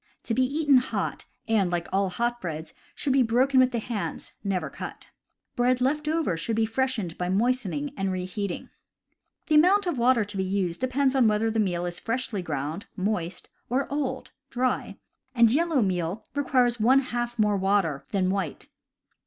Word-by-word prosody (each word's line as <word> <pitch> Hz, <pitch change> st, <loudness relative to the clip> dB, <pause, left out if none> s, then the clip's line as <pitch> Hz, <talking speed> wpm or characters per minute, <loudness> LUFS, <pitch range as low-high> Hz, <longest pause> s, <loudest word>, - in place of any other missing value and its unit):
To 230 Hz, -, -2 dB
be 260 Hz, -, +2 dB
eaten 285 Hz, +1 st, +3 dB
hot, 250 Hz, -, -2 dB, 0.2 s
and, 210 Hz, -5 st, +2 dB
like 175 Hz, -1 st, -2 dB
all 195 Hz, 0 st, +2 dB
hot 240 Hz, +5 st, -2 dB
breads, 160 Hz, -2 st, -5 dB, 0.2 s
should 275 Hz, -, 0 dB
be 270 Hz, -, +4 dB
broken 255 Hz, +3 st, +3 dB
with 255 Hz, -1 st, +5 dB
the 240 Hz, -, -1 dB
hands, 225 Hz, -2 st, -4 dB
never 195 Hz, -3 st, -1 dB
cut. -, -, -8 dB, 0.4 s
Bread 250 Hz, +1 st, +2 dB
left 300 Hz, +4 st, 0 dB
over 315 Hz, -, +1 dB
should 190 Hz, +8 st, -2 dB
be 225 Hz, 0 st, +2 dB
freshened 225 Hz, -6 st, -1 dB
by 180 Hz, 0 st, -1 dB
moistening 250 Hz, +6 st, 0 dB
and 195 Hz, -5 st, -1 dB
reheating. 185 Hz, +1 st, -4 dB, 0.7 s
The 310 Hz, -, -1 dB
amount 370 Hz, +7 st, +5 dB
of 340 Hz, -8 st, -1 dB
water 235 Hz, -2 st, +4 dB
to 200 Hz, 0 st, -7 dB
be 190 Hz, -, +1 dB
used 185 Hz, -1 st, -1 dB
depends 260 Hz, +1 st, +1 dB
upon 260 Hz, -4 st, +4 dB
whether 215 Hz, +1 st, +2 dB
the 225 Hz, -, 0 dB
meal 180 Hz, -4 st, 0 dB
is 175 Hz, 0 st, -4 dB
freshly 230 Hz, -4 st, -2 dB
ground 155 Hz, +3 st, -4 dB
(moist) 185 Hz, -3 st, -3 dB, 0.2 s
or 260 Hz, +3 st, 0 dB
old 265 Hz, -3 st, -3 dB, 0.2 s
(dry), 250 Hz, 0 st, -1 dB, 0.4 s
and 235 Hz, -2 st, +6 dB
yellow 315 Hz, -4 st, +2 dB
meal 185 Hz, +2 st, -2 dB
requires 255 Hz, -4 st, +2 dB
one 260 Hz, +5 st, +5 dB
half 240 Hz, -2 st, -3 dB
more 210 Hz, -2 st, +3 dB
water 190 Hz, -8 st, +1 dB
than 185 Hz, -2 st, +1 dB
white. 190 Hz, -6 st, -3 dB
225 Hz, 175 wpm, -26 LUFS, 190-260 Hz, 0.7 s, and